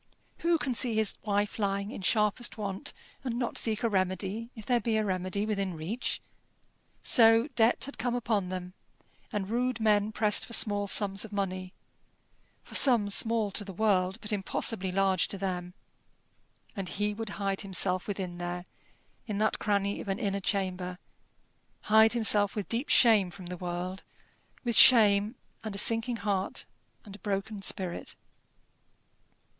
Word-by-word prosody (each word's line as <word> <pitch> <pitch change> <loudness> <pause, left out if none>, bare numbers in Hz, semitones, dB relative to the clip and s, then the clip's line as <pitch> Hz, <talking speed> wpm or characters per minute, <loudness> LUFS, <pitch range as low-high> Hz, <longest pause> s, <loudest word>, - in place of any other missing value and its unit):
Who 335 0 +2
can 275 -4 -2
see 235 0 +1
his 220 -1 0
wife 205 0 -2
lying 200 0 -1
in - - -8
sharpest 210 +4 0
want, 195 -2 -5 0.3
and 240 -3 -3
not 245 -1 -3
seek 220 0 -1
a - - +3
remedy 195 +2 -2
if 220 -3 -10
there 245 -1 +2
be 230 -2 -1
a 215 - 0
remedy 185 +1 -2
within 195 -4 -2
reach? 185 +11 -4 0.8
So 225 +1 +5
debt 240 -3 +2
had 280 - -10
come 245 +1 -1
upon 220 -6 -1
them, 180 -1 -6 0.6
and 205 -4 -3
rude 245 +2 -1
men 210 -1 +2
pressed 210 -1 +1
for 235 - -9
small 205 -2 +3
sums 195 -1 +2
of 220 - -8
money 185 -2 -3 0.9
for - - -16
sums 225 -7 +5
small 225 -2 +4
to 205 - 0
the 195 -1 -9
world, 190 -2 +1
but 210 0 -3
impossibly 195 -1 0
large 190 -1 +1
to 200 - -5
them. 180 -2 -4 1.0
And 195 -4 -4
he 210 +1 -2
would 220 +1 -6
hide 195 -1 -1
himself 185 -2 +1
within 185 -4 -5
there, 175 0 -5 0.6
in 210 -3 -3
that 215 +1 0
cranny 200 -1 -1
of - - -10
an 195 - -2
inner 200 -4 -2
chamber 185 -2 -2 0.8
hide 220 +1 +5
himself 210 -3 +2
with 205 -3 -4
deep 235 +5 -2
shame 215 -6 +5
from 185 +1 -11
the 180 +1 -6
world, 180 +1 -5 0.6
with 240 -2 +1
shame, 215 -2 +6 0.3
and 215 -2 -5
a - - -5
sinking 230 +3 +2
heart, 195 -2 -1 0.4
and 200 -2 -10
a - - -14
broken 200 0 -4
spirit. 185 -2 -3
205 Hz, 160 wpm, -29 LUFS, 190-225 Hz, 1.0 s, shame